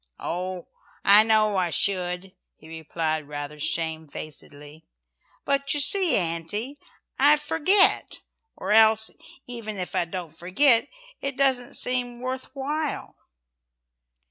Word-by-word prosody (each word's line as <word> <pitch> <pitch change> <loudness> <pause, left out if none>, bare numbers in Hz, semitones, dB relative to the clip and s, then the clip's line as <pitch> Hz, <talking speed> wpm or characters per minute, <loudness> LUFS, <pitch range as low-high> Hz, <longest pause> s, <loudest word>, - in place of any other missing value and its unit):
"Oh, 180 +1 -4 0.4
I 205 +2 +8
know 215 -2 +2
I 180 -2 +1
should," 180 +1 -1 0.2
he 155 - -17
replied 160 -1 -4
rather 145 0 -7
shamefacedly, 155 -1 -6 0.6
"but 280 +1 +1
you - - 0
see, 350 +5 +5
Auntie, 180 - -3 0.4
I 290 +3 +6
forget, 325 +7 +3 0.4
or - - -5
else 220 0 +5 0.3
even 230 -4 -6
if 180 -1 -5
I - - +1
don't 170 -2 -7
forget, 230 - +2 0.3
it 275 -1 -5
doesn't 260 -3 0
seem 245 -1 -2
worth 255 +1 -5
while." 295 +2 -4
210 Hz, 115 wpm, -25 LUFS, 165-265 Hz, 0.6 s, I